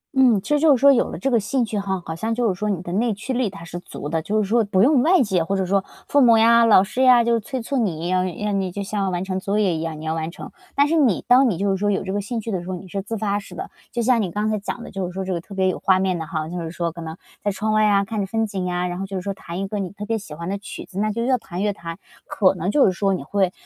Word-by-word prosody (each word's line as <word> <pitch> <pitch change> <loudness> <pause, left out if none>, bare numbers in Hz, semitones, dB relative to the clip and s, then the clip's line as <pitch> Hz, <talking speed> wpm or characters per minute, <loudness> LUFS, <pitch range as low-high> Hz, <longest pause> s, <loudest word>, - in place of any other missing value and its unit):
嗯， 250 -6 +5
其 - - -9
实 295 -1 +3
就 310 -2 +5
是 - - -9
说 280 +2 +7
有 245 - +1
了 - - -6
这 270 - -1
个 235 - +4
兴 235 +4 0
趣 215 -1 -3
哈， 190 -1 -2
好 160 - -4
像 225 +5 -2
就 240 0 +1
是 195 - +1
说 210 - -1
你 195 -4 -1
的 175 0 -5
内 220 +1 +1
驱 240 +5 -4
力 250 -3 0
它 195 -3 -11
是 170 +1 -7
足 150 -4 -8
的， 160 0 -1
就 210 +7 -1
是 - - -4
说 230 +3 +3
不 200 -2 +2
用 275 +1 +5
外 335 +2 +4
界 190 -6 +1
或 195 +4 -1
者 190 - 0
说 195 +1 +1 0.2
父 285 - +3
母 235 -3 +6
呀、 230 +1 +6
老 205 -4 +6
师 215 +6 -3
呀 250 -2 +6
就 230 0 +2
催 255 +4 -5
促 275 +4 -2
你， 175 -6 -1
要 185 0 +2
让 195 +2 -2
你 185 -1 -3
就 200 +3 -4
像 195 -1 -2
完 175 0 -2
成 190 0 -3
作 200 +2 -1
业 195 -5 +2
一 160 - -3
样， 160 -2 -4
你 155 - -8
要 160 - -1
完 160 0 -3
成。 170 - -10 0.2
但 285 +1 +4
是 330 - +1
你 255 - +2
当 250 +1 +6
你 185 - -1
就 200 +2 0
是 195 - 0
说 205 +2 0
有 200 - 0
这 190 0 -4
个 205 - -1
兴 230 +4 -4
趣 225 +1 -5
的 185 -3 -2
时 175 - -9
候， 185 - -2
你 185 +1 -10
是 195 +2 -4
自 225 +3 -5
发 205 -1 -1
式 205 - -12
的， 380 +2 -6 0.2
就 240 - -1
像 240 -1 +3
你 190 - -1
刚 210 +4 -2
才 215 - -1
讲 235 +3 -5
的 - - -9
就 190 -2 -3
是 - - -7
说 190 +1 -4
这 185 - -2
个 170 - -3
特 195 +3 -11
别 190 -1 +2
有 185 - -1
画 190 -1 +3
面 185 -2 0
的 160 - -5
哈， 155 -1 -3
就 175 +2 -5
是 165 - -4
说 170 0 -3
可 170 +1 -9
能 160 0 -7 0.3
在 205 - +1
窗 215 +2 -1
外 215 0 +4
呀， 200 -2 +3
看 220 +1 -4
着 195 - -2
风 225 +2 0
景 195 -3 -4
呀， 180 0 -1
然 175 +1 -4
后 195 - -4
就 195 0 -4
是 - - -3
说 200 - -2
弹 175 -1 -7
一 195 - -2
个 210 +1 -3
你 190 -2 -3
特 200 +3 -8
别 225 +1 -1
喜 155 -7 -10
欢 170 +2 -6
的 195 +1 -2
曲 200 - -8
子， 195 - -7
那 215 +1 +1
就 230 +2 -2
越 255 0 +2
弹 180 -2 -5
越 205 -1 +1
弹， 165 -3 -8 0.3
可 190 -2 +3
能 180 0 -3
就 280 +6 +4
是 - - +4
说 195 +1 0
你 140 - -5
会， 190 +4 0
200 Hz, 370 characters per minute, -22 LUFS, 185-225 Hz, 0.3 s, 说